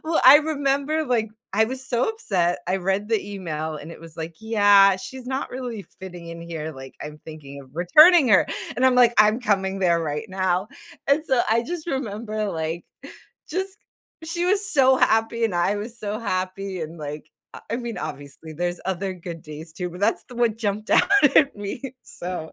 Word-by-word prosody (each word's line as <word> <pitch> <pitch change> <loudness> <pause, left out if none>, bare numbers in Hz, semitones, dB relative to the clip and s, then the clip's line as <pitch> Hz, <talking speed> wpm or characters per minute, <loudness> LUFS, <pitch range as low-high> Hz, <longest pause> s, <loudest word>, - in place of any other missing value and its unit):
well, 320 0 +1
I 265 +3 +11
remember, 295 0 0
like, 230 -3 +1 0.2
I 220 +3 +4
was 260 +3 -6
so 240 -1 +1
upset, 185 - 0
I 185 - +1
read 195 +2 -1
the 210 -2 -1
email, 155 -4 -4
and 150 +2 -9
it - - -12
was 165 -1 -13
like, 165 0 -6
"Yeah, 205 -3 +5
she's 255 +6 -9
not 265 +2 -3
really 245 -4 -5 0.2
fitting 180 -2 -9
in 170 0 -8
here, 160 -2 -5
like, 135 -1 -11
I'm 150 0 -8
thinking 140 -3 -10
of 130 - -19
returning 300 - +6
her," 190 - +5 0.3
and 255 - +1
I'm 260 - +4
like, 240 -1 +5
"I'm 215 +3 +5
coming 195 -4 0
there 170 -3 +3
right 150 -1 -3
now," 185 +1 0 0.4
and 290 +3 +3
so 260 -2 +2
I 230 +1 +3
just 340 +4 -5
remember, 215 -5 -3
like, 160 0 -4 0.6
just 380 +4 -4 0.5
she 345 +2 -2
was 400 +2 +1
so 265 -2 +5
happy, 225 +1 +2
and 220 -5 0
I 175 +4 +1
was 230 +3 -7
so 210 0 -4
happy, 185 -2 -3
and, 160 +1 -7
like, 150 0 -7 0.3
I - - -9
I - - +1
mean, 235 -2 -5
obviously, 145 +3 -8
there's 175 +2 -3
other 190 0 -2
good 170 -2 -8
days 155 +1 -10
too, 180 +2 -4
but 180 +2 -10
that's 210 +3 +1
the 250 - -13
one 235 -2 +1
jumped 210 -1 -3
out - - +5 0.3
at 280 -7 +5
me, 205 +3 -5 0.2
so, 175 -3 -7
205 Hz, 195 wpm, -23 LUFS, 170-245 Hz, 0.6 s, I